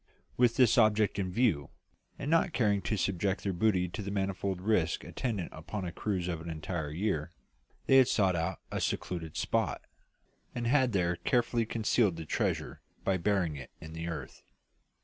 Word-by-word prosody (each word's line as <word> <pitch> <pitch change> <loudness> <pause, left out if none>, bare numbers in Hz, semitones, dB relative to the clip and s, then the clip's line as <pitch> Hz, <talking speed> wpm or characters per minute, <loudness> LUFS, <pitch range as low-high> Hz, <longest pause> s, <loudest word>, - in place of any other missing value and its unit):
With 120 -2 +3
this 125 -1 +5
object 110 -2 +3
in 95 -2 -1
view, 95 - +1 0.5
and 145 - -3
not 165 +1 +3
caring 105 -7 +2
to 105 +4 -1
subject 95 +1 0
their 100 - -1
booty 90 -1 +2
to 100 - -5
the 100 - -4
manifold 95 -1 -1
risks 90 -4 +1
attendant 105 -9 -3
upon 90 +5 -5
a 85 - -4
cruise 95 -2 -2
of 85 -3 -3
an 85 - -7
entire 80 0 -3
year, 85 -1 -1 0.5
they 135 - +6
had 130 -2 +7
sought 95 -4 +2
out 85 +2 -1
a - - -2
secluded 80 -3 -3
spot, - - 0 0.7
and 120 - -2
had 130 -1 +3
there 90 -2 +1
carefully 120 -2 +1
concealed 110 -4 +2
the 80 -1 -6
treasure - - -2 0.2
by 95 -1 +2
burying 90 -5 0
it 65 - -9
in 80 0 -9
the 80 +1 -5
earth. 80 -3 -6
95 Hz, 175 wpm, -31 LUFS, 85-110 Hz, 0.7 s, had